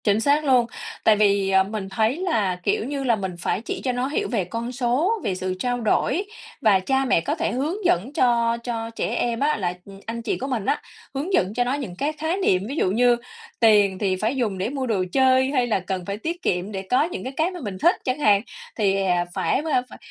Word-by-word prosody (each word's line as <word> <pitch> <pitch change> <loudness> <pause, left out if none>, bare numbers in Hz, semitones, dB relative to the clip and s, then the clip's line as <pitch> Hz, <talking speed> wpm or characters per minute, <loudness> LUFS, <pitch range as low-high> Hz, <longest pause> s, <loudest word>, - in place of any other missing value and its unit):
Chính 205 0 +3
xác 290 +5 +2
luôn. 255 -3 +4 0.4
Tại 220 - +6
vì, 200 -2 +3
ờ, 190 0 +5
mình 200 -1 -5
thấy 220 +7 +1
là, 225 - 0
kiểu - - 0
như 275 +1 -3
là, 240 -3 +3
mình 190 -4 -4
phải 190 - -1
chỉ - - -5
cho 255 - +1
nó 250 +1 -1
hiểu 290 - -1
về 205 -7 0
con 230 +6 -4
số, 255 - +1
về 195 -3 -1
sự 185 0 -3
trao 245 +1 -1
đổi, 320 - +1 0.4
và 205 -4 +5
cha 265 +7 0
mẹ 205 - +3
có - - -1
thể - - -1
hướng 315 - -2
dẫn 240 - +1
cho 235 -3 +2
cho 230 -2 -3
trẻ 230 - -3
em 235 -1 -1
á, 300 +2 +2
là, 180 -3 -1
ừm, 195 -1 -12
anh 230 +1 -4
chị 230 - -2
của 270 - -4
mình 240 -7 -2
á, 290 - 0 0.3
hướng 295 +8 -3
dẫn 190 - +2
cho 245 +2 +1
nó 245 +2 -1
những 260 -11 -4
cái 290 +10 -1
khái 320 +4 -2
niệm. 190 - +2
Ví 275 - -4
dụ 185 - +1
như 240 +3 +4 0.4
tiền 205 -4 +5
thì 190 -2 +1
phải 220 +7 -1
dùng 220 -7 -1
để 190 +4 -1
mua 270 -1 -3
đồ 205 -5 +1
chơi, 260 +1 +4
hay 255 -4 +1
là 220 - +1
cần 185 -1 -4
phải 200 +2 -4
tiết 335 +10 -4
kiệm 180 +3 -1
để 195 -2 -4
có 255 +3 +4
những 340 - -4
cái, 260 - -5
cái 325 +4 +1
mà 360 - -7
mình 200 -4 -5
thích 345 - +5
chẳng 255 +2 -1
hạn. 205 -8 +4 0.4
Thì, 195 -3 +2
à, 180 -2 +1
phải, 265 - 0
ơ, 250 - +4
phải - - -11
235 Hz, 250 wpm, -23 LUFS, 195-270 Hz, 0.4 s, Tại